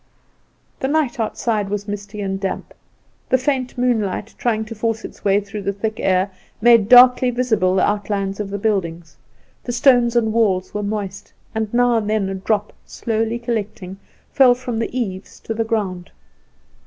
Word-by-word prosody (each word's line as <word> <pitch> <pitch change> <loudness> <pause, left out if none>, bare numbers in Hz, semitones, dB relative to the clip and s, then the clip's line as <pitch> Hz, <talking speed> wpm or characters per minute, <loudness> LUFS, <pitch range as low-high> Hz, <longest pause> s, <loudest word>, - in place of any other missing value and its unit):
The 265 - -1
night 285 -4 0
outside 215 -2 -1
was 205 0 -3
misty 205 0 -6
and 195 -1 -2
damp; 195 -1 -4 0.6
the 260 - +4
faint 260 -1 -2
moonlight, 225 -4 -1
trying 220 -2 0
to 220 - -7
force 225 0 -2
its - - -11
way 200 0 +3
through 205 +1 -7
the 200 0 -2
thick 215 +2 -4
air, 190 +1 +1 0.3
made 230 -2 +5
darkly 250 0 +7
visible 220 -7 +1
the 190 - +3
outlines 200 -1 -2
of 205 -2 -3
the 200 - -3
buildings. 170 -7 -2 0.5
The 245 - -4
stones 245 -1 +4
and 220 -2 +2
walls 195 -5 +1
were 210 - -2
moist, 200 -2 -5 0.2
and 220 -1 -2
now 245 -1 +3
and 210 -2 -2
then 215 -3 0
a - - -3
drop, 205 +2 -1
slowly 225 0 -2
collecting, 210 -5 -4 0.3
fell 255 -2 +6
from 245 -2 -4
the 230 - -1
eaves 190 -5 -5
to 225 - -4
the 225 +1 -1
ground. 195 -6 -3
215 Hz, 170 wpm, -20 LUFS, 195-235 Hz, 0.6 s, darkly